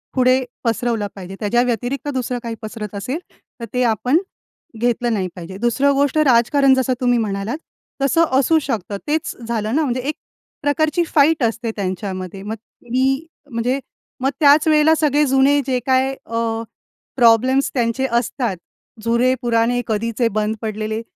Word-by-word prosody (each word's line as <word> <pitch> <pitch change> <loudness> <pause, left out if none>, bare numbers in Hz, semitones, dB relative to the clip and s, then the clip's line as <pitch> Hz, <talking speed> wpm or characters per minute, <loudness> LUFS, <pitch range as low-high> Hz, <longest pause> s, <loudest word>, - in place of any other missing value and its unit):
पुढे 255 0 +3 0.2
पसरवलं 230 -2 0
पाहिजे. 190 -1 -8
त्याच्या 235 +3 +2
व्यतिरिक्त 245 +3 -2
दुसरं 250 -1 -2
काही 230 -1 -4
पसरत 215 -1 -6
असेल, 250 - -3 0.4
तर 230 - -5
ते 250 0 +1
आपण 245 +5 +2 0.6
घेतलं 240 0 +1
नाही 190 -3 -1
पाहिजे. 180 +1 -8
दुसरं 240 +5 +2
गोष्ट 285 +2 +1
राजकारण 270 0 +4
जसं 260 -1 +1
तुम्ही 245 -1 +3
म्हणालात, 210 +4 -2 0.4
तसं 330 +5 +4
असू 320 +4 +4
शकतं. 225 - -3
तेच 310 +1 -1
झालं 220 0 -1
ना 315 - +3
म्हणजे 255 -4 -1
एक 305 - 0 0.5
प्रकारची 305 +3 +1
फाईट 305 0 +4
असते 230 0 -1
त्यांच्यामध्ये, 190 -1 -4
मग 210 +2 -4 0.4
मी 270 +4 +1 0.3
म्हणजे 245 +3 0 0.4
मग 265 +1 +1
त्याच 295 +1 +6
वेळेला 310 +1 +5
सगळे 300 -1 +2
जुने 270 +2 +4
जे 260 -2 +1
काय 265 +1 +2
अ, 230 0 -2 0.5
प्रॉब्लेम्स 255 +3 +4
त्यांचे 240 +1 0
असतात, 235 -2 -1 0.5
जुने-पुराणे, 240 0 +2
कधीचे 230 +2 0
बंद 215 +1 0
पडलेले, 215 0 -3
245 Hz, 145 wpm, -20 LUFS, 225-275 Hz, 0.6 s, त्याच